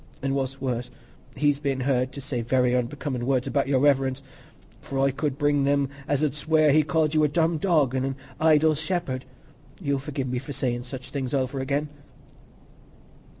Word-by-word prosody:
—and 135 Hz, 0 st, 0 dB
what's 135 Hz, 0 st, -2 dB
worse, 125 Hz, -2 st, -2 dB, 0.5 s
he's 145 Hz, -1 st, +2 dB
been 135 Hz, -3 st, -1 dB
heard 130 Hz, -1 st, +1 dB
to 140 Hz, -, -8 dB
say 130 Hz, -3 st, -3 dB
very 125 Hz, +1 st, +2 dB
unbecomin' 125 Hz, +1 st, -2 dB
words 130 Hz, 0 st, +1 dB
about 140 Hz, -2 st, 0 dB
Your 135 Hz, -2 st, +2 dB
Reverence; 135 Hz, -2 st, +2 dB, 0.6 s
for 135 Hz, -, -6 dB
I 135 Hz, 0 st, +3 dB
could 140 Hz, 0 st, -2 dB
bring 145 Hz, -1 st, +2 dB
them 140 Hz, -1 st, +2 dB, 0.2 s
as 145 Hz, 0 st, +1 dB
'ud 150 Hz, -3 st, +1 dB
swear 155 Hz, +1 st, +3 dB
as -, -, +5 dB
he 155 Hz, -, +6 dB
called 155 Hz, 0 st, +1 dB
you 155 Hz, -1 st, +3 dB
a -, -, +5 dB
'dumb 160 Hz, +1 st, +1 dB
dog,' 150 Hz, -8 st, +2 dB
an' 130 Hz, -1 st, 0 dB
a 135 Hz, 0 st, -2 dB, 0.3 s
'idle 155 Hz, 0 st, +5 dB
shepherd.' 155 Hz, -4 st, -2 dB, 0.5 s
You'll 140 Hz, -6 st, 0 dB
forgi'e 135 Hz, -1 st, -4 dB
me 125 Hz, 0 st, -1 dB
for 135 Hz, +3 st, -7 dB
sayin' 120 Hz, -2 st, -1 dB
such 130 Hz, 0 st, -8 dB
things 135 Hz, -1 st, -2 dB
over 135 Hz, 0 st, -1 dB
again." 140 Hz, +3 st, -1 dB
140 Hz, 190 wpm, -25 LUFS, 130-150 Hz, 0.6 s, he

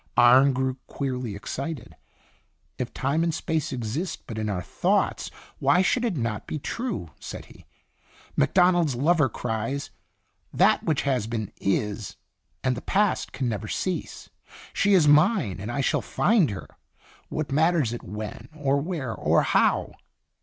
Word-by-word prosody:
Arne 130 Hz, +3 st, +7 dB
grew 130 Hz, 0 st, -1 dB
queerly 125 Hz, -6 st, -3 dB
excited. 135 Hz, +6 st, -5 dB, 0.4 s
" -, -, -42 dB
If -, -, -3 dB
Time 140 Hz, +5 st, 0 dB
and 170 Hz, -, +1 dB
Space 160 Hz, -1 st, -2 dB
exist 130 Hz, -, -3 dB
but 110 Hz, -2 st, -6 dB
in 110 Hz, -1 st, -1 dB
our 90 Hz, -3 st, -2 dB
thoughts, -, -, 0 dB, 0.3 s
why 180 Hz, -, +4 dB
should 245 Hz, +6 st, +1 dB
it 220 Hz, -9 st, 0 dB
not 115 Hz, -4 st, -3 dB
be -, -, -3 dB
true?" 190 Hz, -, -4 dB
said -, -, -8 dB
he. -, -, -19 dB, 0.3 s
" -, -, -28 dB
Macdonald's 175 Hz, -, +3 dB
lover 150 Hz, +2 st, +3 dB
cries, 115 Hz, +5 st, -3 dB, 0.3 s
* -, -, -47 dB, 0.3 s
That -, -, +4 dB
which 155 Hz, -3 st, 0 dB
has 130 Hz, -6 st, 0 dB
been 110 Hz, -3 st, -3 dB
is, 105 Hz, +1 st, -2 dB, 0.5 s
and 130 Hz, -1 st, +1 dB
the 120 Hz, -, -6 dB
Past 205 Hz, +1 st, +1 dB
can 130 Hz, -, -2 dB
never 105 Hz, -2 st, -3 dB
cease. 180 Hz, -, -4 dB, 0.4 s
She 200 Hz, 0 st, +3 dB
is 165 Hz, -5 st, +5 dB
mine, 145 Hz, -, +4 dB
and 105 Hz, +4 st, -5 dB
I 140 Hz, -, -1 dB
shall -, -, +1 dB
find 205 Hz, -, +2 dB
her 100 Hz, -2 st, -6 dB, 0.6 s
what 155 Hz, -3 st, -3 dB
matters 155 Hz, -4 st, +2 dB
it 120 Hz, -, -5 dB
when, 105 Hz, +4 st, -7 dB
or 140 Hz, -2 st, +1 dB
where, 150 Hz, -8 st, -3 dB
or -, -, +2 dB
how?'" -, -, +2 dB
135 Hz, 160 wpm, -26 LUFS, 115-160 Hz, 0.6 s, Arne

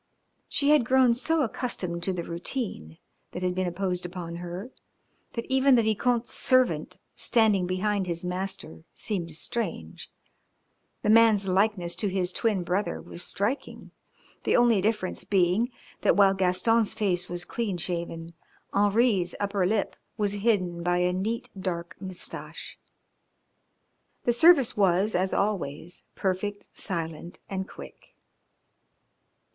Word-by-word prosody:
She 285 Hz, +1 st, +2 dB
had 300 Hz, -4 st, +5 dB
grown 255 Hz, 0 st, +4 dB
so 315 Hz, +6 st, +1 dB
accustomed 190 Hz, -8 st, -2 dB
to 190 Hz, -, 0 dB
the 180 Hz, -2 st, -3 dB
routine 170 Hz, -, -4 dB, 0.4 s
that 180 Hz, -, -5 dB
had 180 Hz, 0 st, +1 dB
been 185 Hz, 0 st, -1 dB
imposed 180 Hz, 0 st, -2 dB
upon 175 Hz, -1 st, -4 dB
her 175 Hz, +7 st, -6 dB, 0.6 s
that 230 Hz, -, -4 dB
even 265 Hz, 0 st, +4 dB
the 230 Hz, -, +4 dB
Vicomte's 230 Hz, +2 st, +1 dB
servant 255 Hz, -, +2 dB, 0.2 s
standing 210 Hz, -6 st, +3 dB
behind 190 Hz, +1 st, 0 dB
his 170 Hz, 0 st, -3 dB
master 180 Hz, -3 st, -4 dB
seemed 170 Hz, -7 st, -3 dB
strange. 165 Hz, -, -4 dB, 0.9 s
The 210 Hz, -, +3 dB
man's 220 Hz, -3 st, +5 dB
likeness 190 Hz, -2 st, +1 dB
to 210 Hz, -, 0 dB
his 185 Hz, -2 st, -1 dB
twin 210 Hz, -6 st, 0 dB
brother 185 Hz, +4 st, -1 dB
was 170 Hz, -, -6 dB
striking, 210 Hz, +11 st, -2 dB, 0.5 s
the -, -, +2 dB
only 235 Hz, -4 st, +4 dB
difference 210 Hz, -2 st, -1 dB
being 195 Hz, +4 st, +2 dB, 0.3 s
that -, -, +4 dB
while 195 Hz, -1 st, +6 dB
Gaston's 195 Hz, +4 st, +2 dB
face 185 Hz, -4 st, 0 dB
was 175 Hz, 0 st, -3 dB
clean 205 Hz, -2 st, -2 dB
shaven, 170 Hz, -1 st, -4 dB, 0.4 s
Henri's 205 Hz, -2 st, +2 dB
upper 200 Hz, -2 st, 0 dB
lip 210 Hz, 0 st, 0 dB, 0.2 s
was 205 Hz, -2 st, 0 dB
hidden 195 Hz, -5 st, 0 dB
by 175 Hz, +1 st, +1 dB
a 180 Hz, 0 st, +2 dB
neat, 215 Hz, +5 st, -2 dB
dark 175 Hz, -2 st, -4 dB
moustache. 185 Hz, -2 st, -7 dB, 1.4 s
The 240 Hz, -, +2 dB
service 275 Hz, 0 st, +5 dB
was, 195 Hz, +1 st, +2 dB
as 185 Hz, +1 st, +1 dB
always, 175 Hz, -5 st, -2 dB
perfect, 200 Hz, +2 st, -2 dB
silent 170 Hz, -2 st, -4 dB
and 190 Hz, 0 st, -4 dB
quick. -, -, -13 dB
195 Hz, 130 wpm, -27 LUFS, 175-220 Hz, 1.4 s, while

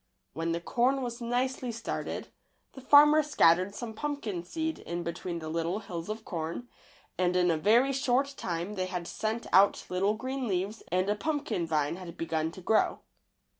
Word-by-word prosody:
When 165 Hz, +1 st, -2 dB
the 170 Hz, -, -1 dB
corn 255 Hz, +8 st, +1 dB
was 240 Hz, 0 st, -5 dB
nicely 250 Hz, +1 st, -1 dB
started, 230 Hz, 0 st, -4 dB, 0.4 s
the 265 Hz, -, -10 dB
far 285 Hz, +3 st, +8 dB
mer 305 Hz, +1 st, +5 dB
scattered 185 Hz, -, +3 dB
some 230 Hz, -1 st, -5 dB
pumpkin 225 Hz, -, -3 dB
seed 320 Hz, -, -3 dB
in 175 Hz, +1 st, -4 dB
between 170 Hz, +1 st, -4 dB
the 160 Hz, -1 st, -6 dB
little 165 Hz, +3 st, -1 dB
hills 185 Hz, -4 st, -6 dB
of 220 Hz, +1 st, -5 dB
corn, 170 Hz, +7 st, -4 dB, 0.5 s
and 180 Hz, 0 st, +2 dB
in 180 Hz, -1 st, +4 dB
a -, -, +2 dB
very 235 Hz, -, +4 dB
short 270 Hz, +1 st, +1 dB
time 175 Hz, 0 st, -3 dB
they 185 Hz, -2 st, -2 dB
had 180 Hz, -2 st, -4 dB
sent 220 Hz, +4 st, -3 dB
out 195 Hz, +2 st, +5 dB
little 195 Hz, +3 st, +1 dB
green 260 Hz, +2 st, -3 dB
leaves 195 Hz, +3 st, -2 dB
and 185 Hz, +2 st, +1 dB
a 205 Hz, -, +3 dB
pumpkin 290 Hz, -, -2 dB
vine 155 Hz, 0 st, 0 dB
had 175 Hz, -2 st, -9 dB
begun 160 Hz, -1 st, -1 dB
to 185 Hz, -, -10 dB
grow. 215 Hz, +4 st, +2 dB
205 Hz, 180 wpm, -29 LUFS, 170-250 Hz, 0.5 s, far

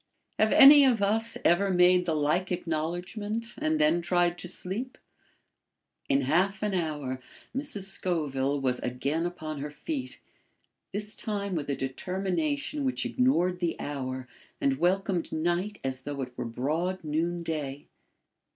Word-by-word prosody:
Have 215 Hz, -, +4 dB
any 285 Hz, +1 st, +10 dB
of 250 Hz, -5 st, +4 dB
us 225 Hz, +3 st, +1 dB
ever 195 Hz, +4 st, +4 dB
made 180 Hz, 0 st, +4 dB
the 160 Hz, -, +1 dB
like 155 Hz, +6 st, +1 dB
acknowledgment 180 Hz, +7 st, -3 dB
and 155 Hz, 0 st, +1 dB
then 155 Hz, +3 st, +3 dB
tried 175 Hz, 0 st, +2 dB
to -, -, -5 dB
sleep? 205 Hz, +8 st, -4 dB, 1.1 s
In 135 Hz, +1 st, +3 dB
half 185 Hz, +9 st, +1 dB
an 210 Hz, -2 st, 0 dB
hour 150 Hz, -7 st, -2 dB, 0.4 s
Mrs. 270 Hz, -8 st, -3 dB
Scoville 145 Hz, -8 st, -1 dB
was 130 Hz, -2 st, 0 dB
again 140 Hz, +7 st, -1 dB
upon 155 Hz, -4 st, -6 dB
her 145 Hz, +2 st, -4 dB
feet, 265 Hz, -, -5 dB, 0.7 s
this 210 Hz, +1 st, -3 dB
time 200 Hz, -2 st, -3 dB
with 150 Hz, -4 st, -3 dB
a 140 Hz, -, +1 dB
determination 195 Hz, -, -2 dB
which 260 Hz, -2 st, 0 dB
ignored 185 Hz, -9 st, +2 dB
the 170 Hz, -2 st, -1 dB
hour 130 Hz, -3 st, -4 dB, 0.3 s
and 135 Hz, -1 st, +1 dB
welcomed 185 Hz, 0 st, +1 dB
night 175 Hz, +6 st, -1 dB
as 130 Hz, -1 st, -2 dB
though 140 Hz, 0 st, -4 dB
it 125 Hz, -1 st, -9 dB
were -, -, -4 dB
broad 155 Hz, +11 st, -2 dB
noon 170 Hz, +3 st, -1 dB
day. 145 Hz, -4 st, -4 dB
175 Hz, 140 wpm, -28 LUFS, 145-200 Hz, 1.1 s, any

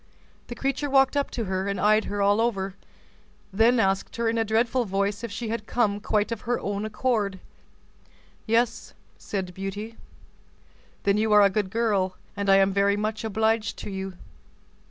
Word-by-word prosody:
The 240 Hz, -, -6 dB
creature 275 Hz, +3 st, -2 dB
walked 270 Hz, 0 st, +4 dB
up 285 Hz, -1 st, 0 dB
to 235 Hz, -, -3 dB
her, 190 Hz, -1 st, -2 dB
and 200 Hz, -1 st, -2 dB
eyed 215 Hz, +2 st, +3 dB
her 205 Hz, 0 st, -1 dB
all 205 Hz, +2 st, +3 dB
over—then 210 Hz, +2 st, -2 dB
asked 195 Hz, -2 st, 0 dB
her 230 Hz, 0 st, -1 dB
in 225 Hz, 0 st, +1 dB
a -, -, +3 dB
dreadful 230 Hz, +3 st, +1 dB
voice 200 Hz, +1 st, -1 dB
if 235 Hz, -, -4 dB
she 225 Hz, +2 st, -4 dB
had 225 Hz, -1 st, -4 dB
come 210 Hz, -4 st, +1 dB
quite 210 Hz, +1 st, 0 dB
of 230 Hz, -, -3 dB
her 245 Hz, 0 st, -1 dB
own 205 Hz, +1 st, -3 dB
accord. 215 Hz, -3 st, -1 dB, 1.1 s
"Yes," 230 Hz, +1 st, 0 dB, 0.2 s
said 190 Hz, -3 st, -4 dB
Beauty. 200 Hz, +4 st, -6 dB, 1.1 s
"Then 200 Hz, 0 st, +2 dB
you 220 Hz, 0 st, +1 dB
are 210 Hz, 0 st, +7 dB
a 200 Hz, -, +4 dB
good 205 Hz, -1 st, -1 dB
girl, 200 Hz, -4 st, 0 dB, 0.2 s
and 200 Hz, -1 st, -2 dB
I 195 Hz, -, +7 dB
am 195 Hz, 0 st, +4 dB
very 200 Hz, +1 st, +2 dB
much 215 Hz, +2 st, -2 dB
obliged 220 Hz, 0 st, 0 dB
to -, -, -7 dB
you." 190 Hz, -1 st, -5 dB
210 Hz, 175 wpm, -25 LUFS, 200-230 Hz, 1.1 s, are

